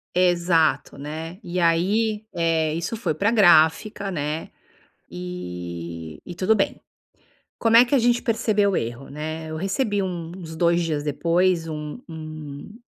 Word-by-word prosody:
Exato, 175 -5 +2
né. 160 +4 -6
E 180 +1 -3
aí, 205 +6 +2
eh, 165 -2 +1
isso 170 +7 -3
foi 225 - -1
pra 200 +8 +1
gráfica, 195 0 +4
né, 150 -2 -3 0.6
e 85 -2 -6
e 175 - -7
tudo 185 +5 +2
bem. 195 - -1 0.8
Como 230 0 +3
é 240 - +8
que 245 - -4
a 270 - +4
gente 240 +1 +3
percebeu 215 -3 +1
o - - +1
erro, 120 +4 -4
né. 155 +2 -5
Eu 155 - -4
recebi 205 - 0
um 175 -3 -4
uns 165 -3 -8
2 170 +1 +3
dias 155 -3 -1
depois 170 +3 +1
um 150 +6 -5
um 155 - -8
165 Hz, 150 wpm, -23 LUFS, 155-195 Hz, 0.8 s, é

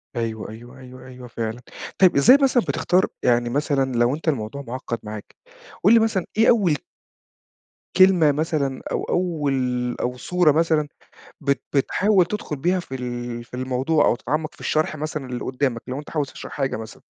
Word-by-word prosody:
أيوه، 115 -2 -3
أيوه، 120 +4 -12
أيوه، 130 0 -12
أيوه 125 -1 -11
فعلًا، 115 0 -4 0.4
طيب 185 -2 +5
إزاي 245 - +7
مثلًا 255 -3 +3
بتختار 180 +1 +1 0.2
يعني 120 -1 +2
مثلًا 135 -1 0
لو 120 +4 +3
أنت 160 - -11
الموضوع 140 -1 -1
معقد 125 -2 -5
معاك، 105 -1 -8 0.5
قل 210 +5 +6
لي 230 - +7
مثلًا 220 -5 0
إيه 225 - +5
أول 195 -10 +4 1.2
كلمة 185 -5 +6
مثلًا 145 -3 -1
أو - - -1
أول 165 -6 -1 0.5
أو 125 +1 -2
صورة 180 +1 +2
مثلًا، 155 -1 +2 0.5
بت 140 -2 0
بتحاول 185 +7 +3
تدخل 180 -4 -4
بها 180 +6 0
في 135 -6 -7
ال 120 -1 -5
في 120 - -25
الموضوع 130 +4 +1
أو - - +3
تتعمق 155 +5 -3
في - - -21
الشرح 155 0 0
مثلًا 155 -3 -4
للي 125 -1 -4
قدامك، 130 -2 -1
لو 130 +3 -4
أنت 150 - -10
عاوز 150 -3 -1
تشرح - - -9
حاجة 135 -5 -1
مثلًا، 110 -1 -10
140 Hz, 170 wpm, -23 LUFS, 125-165 Hz, 1.2 s, إزاي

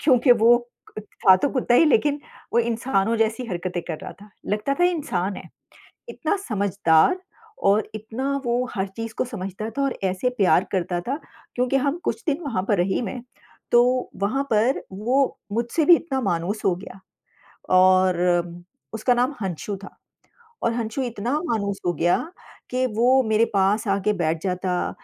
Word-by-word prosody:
क्योंकि 255 -3 +5
वो 235 +1 +5 0.4
अ, - - -4
था 190 -2 +3
तो 280 - 0
कुत्ता 250 -2 +1
ही 325 - +6
लेकिन 290 +1 +2 0.3
वो 235 - +3
इंसानों 230 -2 0
जैसी 225 +2 0
हरकतें 180 -2 -4
कर 160 -2 -5
रहा - - -7
था। 210 - -15 0.2
लगता 210 +7 -1
था - - +5
इंसान 245 - -1
है, - - -10 0.6
इतना 335 +5 -1
समझदार 200 - +2 0.5
और 210 +2 +2
इतना 240 +6 -3
वो 240 +1 +1
हर 195 0 -1
चीज़ 225 -1 -5
को - - 0
समझता 215 -2 -5
था 275 - -3
और 275 - 0
ऐसे 190 +6 0
प्यार 180 -3 +4
करता 180 -2 -1
था 275 +4 -1 0.4
क्योंकि 250 +2 0
हम 280 +5 0
कुछ 450 - -2
दिन 295 +2 +1
वहाँ 230 -10 -1
पर 205 - +2
रही 185 +5 +1
मैं, 235 +2 -5 0.5
तो 250 +1 +3
वहाँ 270 +7 0
पर 230 +5 +2
वो 250 +8 0 0.2
मुझसे 240 +7 0
भी 345 - +8
इतना 270 -5 -3
मानुस 195 +1 -1
हो 185 - +3
गया 185 +2 -11 0.8
और 185 -1 +5 0.8
उसका 245 +3 +2
नाम 250 +4 +1
हंशू 190 +2 -4
था - - -12 0.7
और 230 - +1
हंशू 235 +3 -3
इतना 240 -1 -3
मानुस 200 -6 -2
हो 175 - +2
गया 175 +3 +2 0.5
कि 255 +1 +1
वो 255 +3 +4
मेरे 220 0 +2
पास 200 +3 +2
आके 200 +1 +1
बैठ 165 -4 -1
जाता, 180 -1 -1
220 Hz, 170 wpm, -23 LUFS, 190-255 Hz, 0.8 s, भी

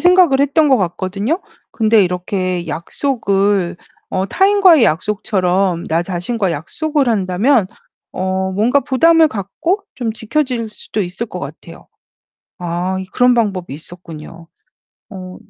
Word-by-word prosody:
생각을 355 -6 +5
했던 290 +2 +3
것 265 - +5
같거든요. 195 - -2 0.3
근데 220 -1 +4
이렇게 180 0 -2
약속을 195 - 0 0.3
어 190 +1 -1
타인과의 380 - +5
약속처럼 185 0 0
나 165 +1 +1
자신과의 185 +2 -2
약속을 290 - -1
한다면 205 +3 +2 0.5
어 190 0 -2
뭔가 230 +8 +2
부담을 325 +5 +4
갖고 300 - -2 0.2
좀 235 -4 -3
지켜질 235 +1 -2
수도 215 - -5
있을 190 +5 -3
것 - - -7
같아요. - - -10 0.7
아 175 +1 -2 0.2
그런 250 0 +4
방법이 195 - -1
있었군요. 165 0 -10 0.6
어 185 -2 -9
200 Hz, 265 characters per minute, -17 LUFS, 180-260 Hz, 0.7 s, 생각을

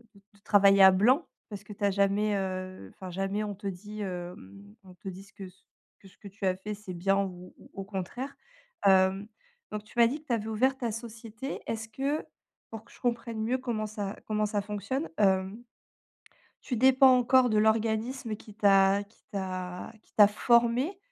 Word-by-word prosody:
de - - -17 0.2
de 200 - -23
travailler 200 -1 +5
à 190 - +10
blanc 240 - +3 0.2
parce 205 -2 -8
que 210 - -10
tu 205 - -9
as 200 - +3
jamais, 200 +2 +1
heu, 185 - -4
enfin, 185 -1 -8
jamais, 195 +3 -2
on 205 -1 -4
te 200 +1 -7
dit, 205 +3 -7
hem, 175 - -8
on 185 -1 -15
te 190 - -8
dit 190 +1 -9
ce 200 - -21
que, 195 - -9
c 180 +1 -20 0.4
que 195 - -16
ce 190 - -21
que - - -12
tu 200 0 -7
as 185 - +2
fait, 210 +3 -6
c'est 200 -3 -8
bien 195 +3 +1
ou 180 -1 -8
ou - - -17
au 195 - -6
contraire. 200 +8 -6 0.5
Hem, 190 +1 +4 0.4
donc 210 0 -5
tu 210 - -19
m'as 235 - +7
dit 285 +6 -4
que 310 - -31
tu 245 - 0
avais 220 -2 -2
ouvert 255 +5 +1
ta 240 -3 -2
société. 230 +3 -7
Est-ce 220 -1 -4
que 275 +6 -2 0.5
pour 225 0 -8
que - - -21
je - - -18
comprenne 235 -2 -2
mieux 245 +3 0
comment 240 -4 -3
ça 205 -2 -5
comment 215 -1 0
ça 205 -1 -1
fonctionne, 210 - -3
hem 190 +2 +1 1.0
tu 250 - -3
dépends 260 +1 +6
encore 250 0 +4
de 215 - +1
l'organisme 220 +2 0
qui 210 0 -14
t'a 200 -1 +4
qui 205 +2 -27
t'a 185 -2 -5
qui - - -32
t'a 205 -1 +7
formé 235 - +2
210 Hz, 200 wpm, -29 LUFS, 195-230 Hz, 1.0 s, à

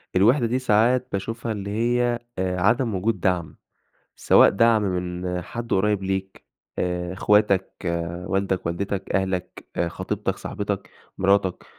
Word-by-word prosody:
الوِحدة 120 +8 +4
دي 120 +3 0
ساعات 125 +2 +3
باشوفها 115 +4 -3
اللي 100 -2 -4
هي، 120 +2 +1 0.2
آآ، 90 -1 -1
عدم 115 +2 +2
وجود 100 +2 0
دعم، 90 -4 -1 0.6
سواء - - +6
دعم 115 +1 +3
من 90 -1 -2
حد 115 +6 -7
قريب 100 +1 +2
ليك 95 0 -3 0.3
آآ، 90 0 -2
أخواتك، 100 0 +2 0.5
والدك، 95 -1 -1
والدتك، 95 +3 -3
أهلك، 95 -1 -2 0.2
خطيبتك، 85 - -3
صاحبتك، - - -4 0.3
مراتك، 95 -1 +2
100 Hz, 120 wpm, -24 LUFS, 90-115 Hz, 0.6 s, سواء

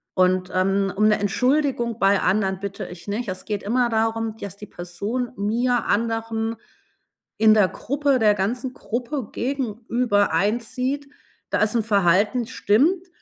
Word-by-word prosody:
Und, 185 0 +2
ähm, 195 +1 +1
um 215 - +3
'ne 210 - +3
Entschuldigung 250 +2 +1
bei 195 0 +4
anderen 190 0 +1
bitte 200 0 -5
ich 175 +2 -11
nicht. 210 +2 -3
Es 185 0 -6
geht 210 -2 -3
immer 240 +4 +1
darum, 225 0 0
dass 200 -2 -7
die 210 - -9
Person 200 +9 -4
mir, 235 +4 0
anderen 225 0 -1 0.8
in 220 0 +6
der 210 -3 +5
Gruppe, 280 0 0
der 210 -2 +5
ganzen 245 +6 -2
Gruppe 245 +1 -4
gegenüber 235 - 0
einsieht: 250 - -1 0.4
„Da - - +1
ist 215 +1 +2
'n 230 - +2
Verhalten, 205 +3 +2
stimmt. 310 - +2
220 Hz, 145 wpm, -23 LUFS, 200-245 Hz, 0.8 s, in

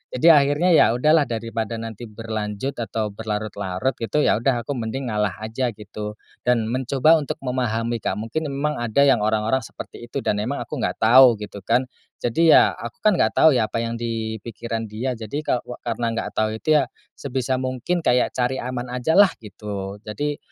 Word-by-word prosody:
Jadi 125 +6 +2
akhirnya 145 +4 +4
ya - - +7
udahlah 155 +5 +4
daripada 115 -1 -3
nanti 115 0 -7
berlanjut 110 +3 -4
atau 110 -2 -2
berlarut-larut 105 +1 -3
gitu 115 +6 -1
ya - - +4
udah 120 -1 0
aku - - -2
mending 120 +1 -3
ngalah 105 -3 0
aja 115 +4 -2
gitu. 105 0 -7 0.3
Dan 120 -3 +2
mencoba 130 +5 +3
untuk 145 - -4
memahami 120 -2 -1
Kak, - - -1
mungkin 145 +7 -3
emang 150 +2 -1
ada 120 +3 +1
yang 140 -3 +5
orang-orang 110 +4 +1
seperti 120 - -10
itu - - -2
dan 105 - 0
emang 140 +6 -3
aku - - -6
enggak 120 - -2
tahu 125 +2 +8
gitu 100 -1 -8
kan. 125 +3 +2 0.4
Jadi 160 +7 +4
ya, - - +6
aku 115 0 -9
kan 210 -4 +4
enggak - - +2
tahu 160 - +7
ya 115 - +2
apa 115 - -2
yang 115 0 -3
di 115 -1 -3
pikiran 115 0 -4
dia. 110 +5 -3
Jadi 115 +7 -4
kawa 125 -3 -2
karena 120 0 -2
enggak 115 - -3
tahu 110 0 +1
itu 155 -1 +4
ya, 135 - +1 0.3
sebisa 130 -1 -2
mungkin 130 +7 -2
kayak 125 0 +3
cari 125 +1 -1
aman 125 0 -4
ajalah 160 +11 +5
gitu. 100 -2 -6
Jadi 145 +7 -3
120 Hz, 185 wpm, -22 LUFS, 110-135 Hz, 0.4 s, tahu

